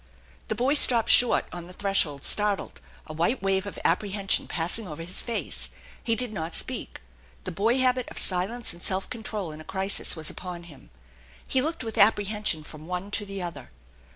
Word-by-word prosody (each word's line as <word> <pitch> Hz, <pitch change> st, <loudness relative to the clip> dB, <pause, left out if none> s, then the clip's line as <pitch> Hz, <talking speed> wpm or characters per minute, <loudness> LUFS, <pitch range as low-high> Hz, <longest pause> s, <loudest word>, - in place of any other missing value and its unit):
The 215 Hz, -, -2 dB
boy 255 Hz, +6 st, +2 dB
stopped 240 Hz, -6 st, +6 dB
short 245 Hz, -, +6 dB
on 175 Hz, -1 st, -7 dB
the 180 Hz, -, -12 dB
threshold, 180 Hz, -8 st, +1 dB
startled, 205 Hz, -2 st, 0 dB, 0.2 s
a 155 Hz, -, -8 dB
white 175 Hz, +10 st, 0 dB
Wave 195 Hz, 0 st, +1 dB
of 200 Hz, -, -7 dB
apprehension 195 Hz, +2 st, +1 dB
passing 180 Hz, +6 st, -2 dB
over 160 Hz, 0 st, -7 dB
his 180 Hz, +3 st, 0 dB
face. 145 Hz, -, -3 dB, 0.3 s
He 230 Hz, -, +1 dB
did 240 Hz, -1 st, -3 dB
not 165 Hz, -4 st, -4 dB
speak. -, -, -4 dB, 0.4 s
The -, -, -5 dB
boy 225 Hz, +7 st, +1 dB
habit 255 Hz, -1 st, +2 dB
of -, -, -11 dB
silence 195 Hz, +6 st, +1 dB
and 170 Hz, -, -14 dB
self 190 Hz, 0 st, -1 dB
control 215 Hz, -7 st, -4 dB
in 155 Hz, +1 st, -10 dB
a -, -, -10 dB
crisis 190 Hz, +3 st, 0 dB
was 160 Hz, -2 st, +1 dB
upon 180 Hz, -2 st, -7 dB
him. 160 Hz, -5 st, -15 dB, 0.6 s
He 260 Hz, -, +1 dB
looked 315 Hz, 0 st, -2 dB
with 225 Hz, -1 st, -4 dB
apprehension 205 Hz, -5 st, +2 dB
from 155 Hz, +1 st, -11 dB
one 180 Hz, +3 st, -4 dB
to 205 Hz, 0 st, -1 dB
the 195 Hz, -1 st, -5 dB
other. 145 Hz, -7 st, -7 dB
195 Hz, 185 wpm, -26 LUFS, 170-220 Hz, 0.6 s, stopped